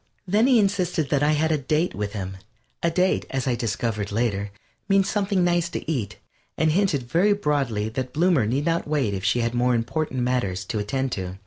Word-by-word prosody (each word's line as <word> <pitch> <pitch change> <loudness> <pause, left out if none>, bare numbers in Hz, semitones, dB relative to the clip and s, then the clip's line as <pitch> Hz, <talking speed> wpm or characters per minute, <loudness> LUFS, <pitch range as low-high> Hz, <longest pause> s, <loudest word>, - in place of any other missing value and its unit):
Then 210 +6 +3
he 260 -3 +5
insisted 180 -7 0
that 145 -2 +2
I 150 +1 +3
had 160 +1 +1
a 155 - +1
"date" 155 +6 0
with 105 0 -4
him. 95 -2 -5 0.4
A 170 - +2
date, 180 +3 +1
as 135 -1 -2
I 130 - +1
discovered 110 -2 -2
later, 105 -2 -1 0.4
means 195 0 +4
something 200 -3 +1
nice 175 -1 +1
to - - -6
eat 130 -11 -2 0.4
and 160 0 +2
hinted 175 -6 +1
very 180 +11 +3
broadly 140 - 0
that 125 +2 -4
Bloomer 160 - +2
need 135 +6 0
not 165 -1 0
wait 140 -9 0
if 95 -1 -4
she 120 - +2
had 115 0 -1
more 125 0 +2
important 130 +3 -2
matters 100 -7 -1
to 110 - -3
attend 130 +6 -2
to. 95 -2 -4
135 Hz, 205 wpm, -24 LUFS, 115-170 Hz, 0.4 s, he